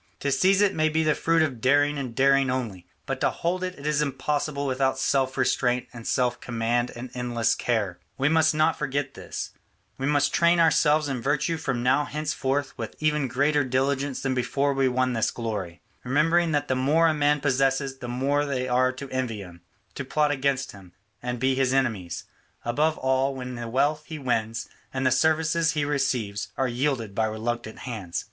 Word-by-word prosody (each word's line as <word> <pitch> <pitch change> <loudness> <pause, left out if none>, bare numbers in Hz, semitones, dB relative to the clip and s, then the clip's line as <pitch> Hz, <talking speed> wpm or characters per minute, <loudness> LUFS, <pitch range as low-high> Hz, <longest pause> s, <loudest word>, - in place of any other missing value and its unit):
To 140 - 0
seize 190 +7 +4
it 200 - +3
may 155 0 +2
be 160 +1 +1
the 155 -1 +3
fruit 165 +1 +2
of 130 -7 -3
daring 145 +3 +3
and 125 -4 -5
daring 135 0 +4
only, 115 -9 -3 0.2
but - - -4
to - - +3
hold 180 +2 -2
it 185 0 -3
is 150 +1 -1
impossible 145 0 -1
without 130 0 +1
self 135 0 +1
restraint 125 -1 +1
and 115 -2 -8
self 125 -1 0
command 120 +1 0
and 120 +1 -7
endless 120 -2 0
care. 105 -7 -1 0.2
We 135 - +2
must 160 0 +3
not 155 0 +3
forget 140 -1 -2
this; - - -6 0.5
we 135 - -1
must 145 -1 +2
train 170 0 +4
ourselves 155 -2 +4
in 135 -3 -3
virtue 150 +5 0
from 130 -6 -2
now 135 +4 +3
henceforward 145 -2 -1
with - - -6
even 150 -2 +1
greater 145 +4 +2
diligence 135 +1 -1
than 135 -1 0
before 135 +3 0
we 135 -1 +2
won 130 0 +1
this 115 -2 +1
glory, 100 -7 -5 0.2
remembering 160 +6 +2
that 145 -1 0
the - - +1
more 150 +6 +3
a 160 - +3
man 150 0 +2
possesses, 135 0 0
the 120 - -6
more 135 +4 0
there 130 -3 -2
are 130 +1 +3
to 135 +1 -8
envy 125 -5 -2
him, 85 -2 -13 0.3
to 140 - -5
plot 150 +2 +1
against 135 -2 0
him, 95 -3 -15 0.3
and 125 0 -3
be 130 +2 +2
his 130 -1 +1
enemies, 110 -10 -1 0.4
above 150 +7 +1
all 130 +1 +1
when 125 -1 -6
the 120 -1 -5
wealth 145 +5 +1
he 160 - -6
wins 115 -5 -2 0.2
and 130 0 -2
the 130 - +4
services 160 +3 +2
he 150 -2 0
receives 125 -8 -1
are 135 - +1
yielded 120 -4 -1
by 110 +2 +1
reluctant 110 +1 -3
hands. 105 -9 -4
135 Hz, 190 wpm, -25 LUFS, 125-150 Hz, 0.5 s, seize